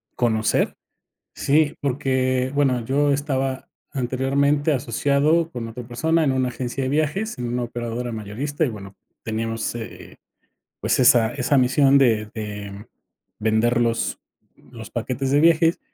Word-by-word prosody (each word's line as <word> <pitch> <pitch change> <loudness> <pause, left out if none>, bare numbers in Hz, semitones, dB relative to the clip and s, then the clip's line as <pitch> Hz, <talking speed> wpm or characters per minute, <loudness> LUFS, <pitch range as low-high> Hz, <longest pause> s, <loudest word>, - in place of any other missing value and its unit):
conocer. 110 -2 +1 0.6
Sí, 150 +1 +2
porque, 130 -1 0
bueno, 130 -4 +1
yo 140 +3 +2
estaba 135 -2 -2 0.2
anteriormente 140 +3 +1
asociado 145 +6 +1
con 120 -4 -5
otra 120 +2 -8
persona 160 +7 +1
en 135 - +2
una 130 -1 0
agencia 125 +2 -4
de 130 - -1
viajes, 155 - -1
en 120 - -3
una 120 +1 -2
operadora 120 0 -4
mayorista 115 +8 -3
y, - - 0
bueno, 100 -3 -9 0.3
teníamos, 115 0 -3
eh, 115 -1 -9 0.7
pues - - +1
esa 120 -2 +5
esa 140 +1 +1
misión 135 +2 +4
de 110 -5 +2
de 105 -2 -7 0.5
vender 110 +2 +2
los 115 -1 0 0.4
los 115 -3 -12
paquetes 130 +3 -3
de 145 - +4
viajes 165 +1 +4
130 Hz, 135 wpm, -22 LUFS, 115-140 Hz, 0.7 s, esa